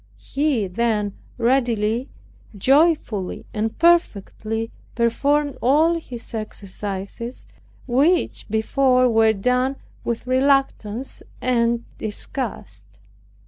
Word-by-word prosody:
He 280 -7 -1
then 210 +1 -1 0.2
readily, 235 -1 +1 0.5
joyfully, 270 - +2
and 220 +1 -2
perfectly 225 - +1 0.2
performed 280 +5 +1
all 315 +7 +3
his 240 -8 -8
exercises, 205 +1 -6 0.4
which 285 +8 +1
before 255 +4 +3
were 225 -2 +4
done 250 +6 +1 0.3
with 235 0 -3
reluctance 260 -3 0 0.2
and 235 -1 +1
disgust. 235 +5 -2
235 Hz, 80 wpm, -22 LUFS, 220-275 Hz, 0.5 s, were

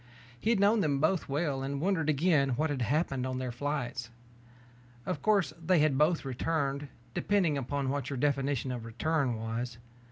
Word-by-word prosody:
He 220 - -1
had 230 -3 +3
known 205 +3 +4
them 145 -5 +1
both 160 +3 +1
well 140 -1 0
and 140 +1 -3
wondered 165 -2 +1
again 145 -4 +3
what 155 +2 0
had 135 -3 -2
happened 135 0 0
on 130 0 -3
their 130 -1 -3
flights. 120 -3 -3 1.0
Of 185 - -3
course, 200 -8 +2
they 180 +2 +3
had 155 -3 +3
both 150 +3 +2
returned, 140 +1 -1 0.3
depending 190 -7 +2
upon 140 0 -2
what 140 0 -2
your 140 - -3
definition 140 -1 0
of 120 -2 -4
return 130 +3 0
was. 115 +2 -4
140 Hz, 170 wpm, -30 LUFS, 130-160 Hz, 1.0 s, known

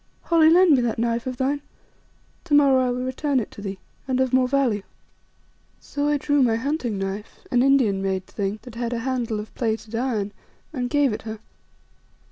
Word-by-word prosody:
"Holly, 325 -2 +5
lend 355 +1 +6
me 255 - +2
that 235 -2 -1
knife 235 +1 -1
of 255 -1 -4
thine, 280 +3 0 0.8
to 300 -4 +2
morrow 270 -3 +5
I - - 0
will 250 +1 -2
return 265 +1 0
it 225 - -5
to - - -10
thee, 195 -1 -5 0.3
and 260 -1 0
of 260 -1 +1
more 255 -1 +4
value." 250 -6 +1 1.0
So 290 0 -3
I 295 0 +2
drew 290 0 +1
my 235 -3 +3
hunting 250 -3 -2
knife, 195 +2 -5
an 245 - +3
Indian 255 -8 +3
made 190 -1 -1
thing, 200 +1 -3
that 245 - -11
had 235 +1 -3
a 235 - -2
handle 240 -5 -1
of 210 - -8
plated 220 -2 -3
iron, 225 -4 -1 0.4
and 250 -4 -2
gave 285 -4 +2
it - - -5
her. 220 0 -6
245 Hz, 195 wpm, -23 LUFS, 220-275 Hz, 1.0 s, lend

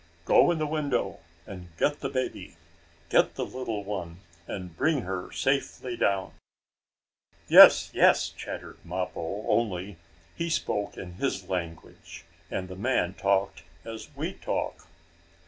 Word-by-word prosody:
"Go - - +6
in 170 - +1
the 155 - -1
window 145 -4 -1 0.3
and 90 -2 -9
get 145 - +1
the 135 - -3
baby 130 -1 -4 0.5
get - - +3
the - - -2
little 115 -5 -4
one 90 -5 -5 0.3
and 90 -4 -6
bring 145 - +1
her 95 -3 -5
safely 135 -2 -1
down." 100 -4 0 1.1
"Yes, - - +9
yes!" - - +4
chattered - - -8
Mappo, 90 +2 -4
only 95 -4 0 0.4
he 170 0 -2
spoke 105 -10 -2
in 90 -1 -8
his 95 -7 -2
language 85 -2 -6 0.2
and 95 - -3
the 95 - -8
man 100 -3 0
talked 100 -2 0 0.2
as 115 -1 -8
we - - -3
talk. - - -4
100 Hz, 130 wpm, -27 LUFS, 90-130 Hz, 1.1 s, Yes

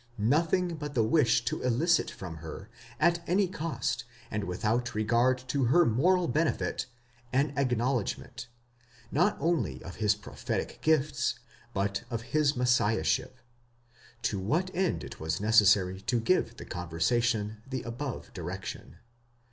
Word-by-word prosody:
Nothing 165 - +1
but 150 -1 -6
the 115 - +4
wish 120 -1 +3
to - - -2
elicit 155 +8 +2
from 85 -4 -8
her, 80 0 -8 0.3
at 170 +2 +3
any 190 +2 +3
cost, 145 -8 -2 0.3
and 105 -2 -2
without 110 +6 -1
regard 120 +4 +3
to 135 -1 +1
her 170 +9 +5
moral 175 +10 +3
benefit, 155 -4 0 0.4
an 140 +2 +1
acknowledgment, 125 -3 -1 0.6
not 180 +8 +2
only 135 - 0
of 90 - -9
his 105 -1 +3
prophetic 105 0 -4
gifts, 150 -3 +1 0.3
but 100 0 -1
of 115 -2 -3
his 150 -1 +3
Messiahship; 125 0 +1 0.9
to 100 - 0
which 160 - 0
end 185 0 0
it - - -9
was 80 +1 -2
necessary 100 -3 +4
to 120 +4 0
give 185 +11 +1
the - - -8
con 90 -2 -6
versation 110 +5 +1
the 130 -2 -3
above 120 +2 -5
direction. - - -6
120 Hz, 135 wpm, -29 LUFS, 105-155 Hz, 0.9 s, her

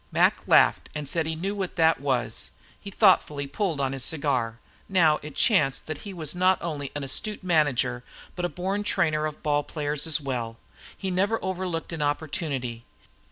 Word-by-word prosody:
Mac - - +3
laughed - - +4
and 150 -1 -4
said 160 +2 0
he 160 - -2
knew 195 +5 -3
how 185 - -1
that 160 -3 +3
was, 135 -3 -1 0.3
then 200 - -7
thoughtfully 165 -9 +3
pulled 165 +2 -2
on 135 -1 0
his 135 -2 -4
cigar. 130 -7 -1 0.3
Now 165 -5 +4
it 150 -1 -9
chanced 155 - +2
that 155 -2 -5
he 205 - -8
was 160 -5 -2
not 185 +1 +3
only 150 -5 -4
an 145 - -3
astute 205 +10 -2
manager, 140 -8 +1 0.3
but 180 - -4
a 175 - +1
born 190 +3 -2
trainer 160 -7 +1
of 150 - -9
ball 145 -1 +2
players 150 0 -2
as 155 -3 +3
well. 120 -5 -4 0.4
He 190 -1 -3
never 200 +5 +1
overlooked 180 -3 -3
an 160 - -4
opportunity. 145 -5 -2
155 Hz, 180 wpm, -26 LUFS, 140-180 Hz, 0.4 s, laughed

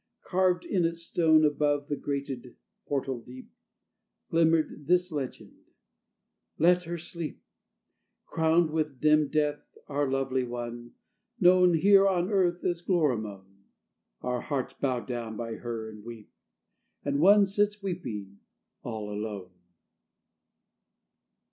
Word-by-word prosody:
Carved 180 -1 +1
in 185 -4 +1
its 170 0 -2
stone, 160 -2 +4
Above 145 -1 +1
the 145 - -1
grated 140 -3 -5 0.3
portal 135 -3 -2
deep, 125 +2 -12 0.8
Glimmered 160 -3 +2
this 180 +1 +2
legend: 140 -4 -5 1.0
"Let 180 +2 +4
her 170 +1 -4
sleep, 170 -1 -6 0.8
Crowned 160 0 +2
with 150 -4 -2
dim 155 -1 +4
death, 150 0 -2
our 145 -1 -1
lovely 135 -1 0
one, 120 -1 -6 0.5
Known 180 -1 +5
here 195 +4 +6
on 185 0 +1
Earth 180 -3 +1
as 175 -1 -1
Gloramone. 105 - -2 0.5
Our 125 -1 -2
hearts 135 -4 -3
bow 130 -3 -1
down 115 -1 -5
by 115 -1 -5
her 115 -2 -5
and 105 -1 -12
weep, 115 -2 -10 0.7
And 140 0 0
one 200 +5 +6
sits 205 +1 0
weeping 105 - -5 0.4
all 110 -3 -5
alone." 105 -3 -5
145 Hz, 115 wpm, -28 LUFS, 120-175 Hz, 1.0 s, here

